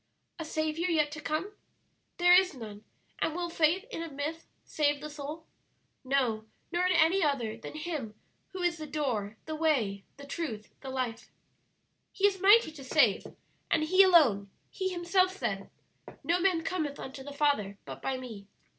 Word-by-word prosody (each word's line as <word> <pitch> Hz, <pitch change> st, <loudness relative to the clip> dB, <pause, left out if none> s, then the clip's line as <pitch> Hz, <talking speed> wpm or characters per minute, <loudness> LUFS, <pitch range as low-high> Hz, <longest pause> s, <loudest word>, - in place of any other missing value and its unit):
"'A 325 Hz, -, -4 dB
Saviour 315 Hz, +3 st, -1 dB
yet 305 Hz, -3 st, +2 dB
to 305 Hz, 0 st, -7 dB
come?' 320 Hz, +7 st, -2 dB, 0.6 s
There 355 Hz, 0 st, +6 dB
is 365 Hz, -3 st, +5 dB
none; 215 Hz, -4 st, -9 dB, 0.4 s
and 320 Hz, -, 0 dB
will 345 Hz, -1 st, -3 dB
faith 335 Hz, +5 st, +2 dB
in 330 Hz, -, -4 dB
a 330 Hz, -, -5 dB
myth 300 Hz, +3 st, -5 dB, 0.2 s
save 290 Hz, -1 st, +1 dB
the 300 Hz, +1 st, -7 dB
soul? 300 Hz, +2 st, -7 dB, 0.6 s
No; 255 Hz, -5 st, 0 dB, 0.3 s
nor 350 Hz, +1 st, +2 dB
in 365 Hz, -, +3 dB
any 330 Hz, +3 st, +4 dB
other 250 Hz, -7 st, 0 dB
than 230 Hz, +6 st, -9 dB
Him 305 Hz, -9 st, -4 dB, 0.3 s
who 370 Hz, -1 st, -5 dB
is 345 Hz, -1 st, +1 dB
the 310 Hz, -, -6 dB
Door, 240 Hz, -9 st, -2 dB
the 315 Hz, -, -4 dB
Way, 260 Hz, -12 st, +1 dB
the 280 Hz, -, -10 dB
Truth, 280 Hz, -8 st, -5 dB
the 270 Hz, -, -7 dB
Life. 255 Hz, -3 st, -3 dB, 0.8 s
"'He 400 Hz, -, +1 dB
is 390 Hz, -2 st, +2 dB
mighty 405 Hz, -2 st, +6 dB
to 300 Hz, -3 st, -11 dB
save,' 260 Hz, -6 st, +3 dB, 0.4 s
and 315 Hz, -, +2 dB
He 370 Hz, +5 st, +5 dB
alone; 280 Hz, -, +5 dB, 0.2 s
He 375 Hz, -1 st, -2 dB
Himself 370 Hz, +1 st, +1 dB
said, -, -, -3 dB, 0.5 s
'No 345 Hz, +2 st, +2 dB
man 355 Hz, -3 st, +2 dB
cometh 310 Hz, -6 st, -2 dB
unto 265 Hz, 0 st, -7 dB
the 285 Hz, -, -8 dB
Father, 280 Hz, -9 st, +1 dB
but 135 Hz, -1 st, -8 dB
by 265 Hz, -, -1 dB
Me.' 225 Hz, -6 st, -9 dB
305 Hz, 170 wpm, -30 LUFS, 260-345 Hz, 0.8 s, There